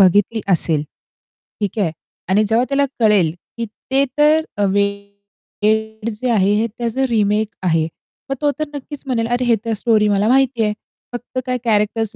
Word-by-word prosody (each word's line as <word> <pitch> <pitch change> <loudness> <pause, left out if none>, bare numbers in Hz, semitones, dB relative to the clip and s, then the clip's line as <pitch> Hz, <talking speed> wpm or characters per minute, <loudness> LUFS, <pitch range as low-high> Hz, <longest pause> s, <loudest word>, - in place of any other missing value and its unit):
बघितली 205 +4 +4
असेल. 160 -3 +1 0.8
ठीक 205 +1 -2
आहे. 180 -6 +1 0.4
आणि 200 +3 +4
जेव्हा 230 +3 +3
त्याला 280 0 +2
कळेल, 205 -8 +4 0.2
की 235 - -2 0.3
ते 270 +1 +4
तर 300 -8 +3
वेड 200 +2 -2
जे 230 +3 -3
आहे 200 -3 +3
हे 230 - +1
त्याचं 240 +2 -1
रिमेक 215 -1 +2 0.2
आहे. 165 -3 +2 0.4
मग 270 - 0
तो 295 -1 +3
तर 310 - 0
नक्कीच 290 +1 -8
म्हणेल, 230 -3 0
"अरे 250 - -1
हे 235 -1 +4
तर 230 - 0
स्टोरी 220 -3 +3
मला 205 +1 +2
माहितीये, 245 -4 +3 0.4
फक्त 245 +1 -4
काय 255 -1 -1
कॅरेक्टर्स 215 -1 0
220 Hz, 160 wpm, -19 LUFS, 200-245 Hz, 0.8 s, बघितली